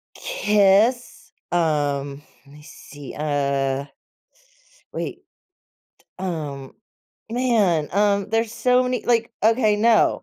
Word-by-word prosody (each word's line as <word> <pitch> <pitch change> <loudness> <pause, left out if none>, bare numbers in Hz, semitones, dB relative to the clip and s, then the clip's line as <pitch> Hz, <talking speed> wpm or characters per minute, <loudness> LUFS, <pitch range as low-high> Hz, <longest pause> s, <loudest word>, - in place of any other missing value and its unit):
Kiss, 215 - +1 0.2
um, 145 -4 -1 0.2
let 140 - -18
me 150 - -15
see. 145 -2 -12
Uh, 140 -2 -1 1.1
wait, - - -5 1.0
um, 150 -7 -5 0.6
man, 220 -11 +1
um, 200 0 +1
there's 225 0 0
so 250 +1 +2
many, 250 0 -2
like 230 -1 +1
okay, 220 -1 +3
no. 225 +1 +3
195 Hz, 95 wpm, -22 LUFS, 145-230 Hz, 1.1 s, okay